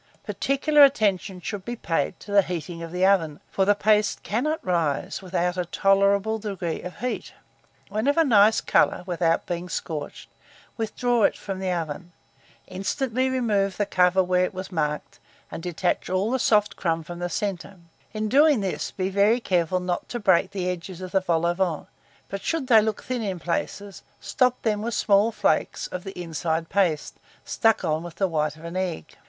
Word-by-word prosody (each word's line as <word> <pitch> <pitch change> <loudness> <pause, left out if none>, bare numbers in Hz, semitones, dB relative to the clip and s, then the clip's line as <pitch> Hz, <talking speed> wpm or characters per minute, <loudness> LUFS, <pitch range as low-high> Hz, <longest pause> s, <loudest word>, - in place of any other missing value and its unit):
Particular 290 +2 +3
attention 200 -8 +2
should 205 +3 -4
he 240 - -3
paid 165 -6 -2
to 205 - -10
the 200 0 +6
heating 170 -2 -5
of 165 -1 -7
the 180 +1 +1
oven, 165 -7 +2
for 190 - +1
the 205 +1 +4
paste 210 0 +2
cannot 300 +9 -1
rise 170 +1 -1
without 180 -1 -1
a 180 - -1
tolerable 200 +4 +2
degree 195 -6 -4
of 180 - -8
heat 250 0 -3 0.5
When 215 +5 -2
of 285 - +2
a 330 - +6
nice 220 -5 +5
colour, - - +2
without 170 -2 0
being 175 +1 -4
scorched, 155 -3 -5 0.5
withdraw 235 +1 0
it - - +1
from 195 -2 -6
the 190 -1 -2
oven, 170 0 -4 0.5
instantly 255 +7 -1
remove 210 -7 0
the 205 - +1
cover 185 -1 +3
where 180 0 +2
it 180 - -2
was 185 +1 -6
marked, 150 -3 -3 0.3
and - - -6
detach 175 +1 -2
all 190 +5 0
the 260 - 0
soft 210 -3 +2
crumb 165 -2 -1
from 175 +2 -8
the 175 0 -2
centre: 195 0 -4 0.3
in 215 0 -2
doing 285 +1 +4
this, 190 -2 -2
be 190 0 -3 0.3
careful 180 -4 0
not 180 -1 -3
to 240 - -4
break 190 -5 +3
the 185 -2 -3
edges 180 0 -5
of 185 -1 -7
the 190 - +3
vol 170 -2 0
au 170 - +2
vent; 175 -4 -2 0.4
but 195 0 -5
should 325 +2 -1
they 230 -4 +6
look 215 -1 -2
thin 250 -2 -3
in 195 -4 -3
places, 190 +3 -4 0.2
stop 250 -1 +1
them 210 -2 0
with 230 0 -3
small 205 +2 +3
flakes - - 0
of 180 -1 -6
the 195 -2 -8
inside 165 -1 -2
paste, 175 -6 0 0.3
stuck 225 -4 +2
on 155 -1 0
with 170 -1 -9
the 195 - +1
white 155 -3 -1
of 160 - -15
an 170 +1 -7
egg. 185 - -4
190 Hz, 185 wpm, -25 LUFS, 175-215 Hz, 0.5 s, the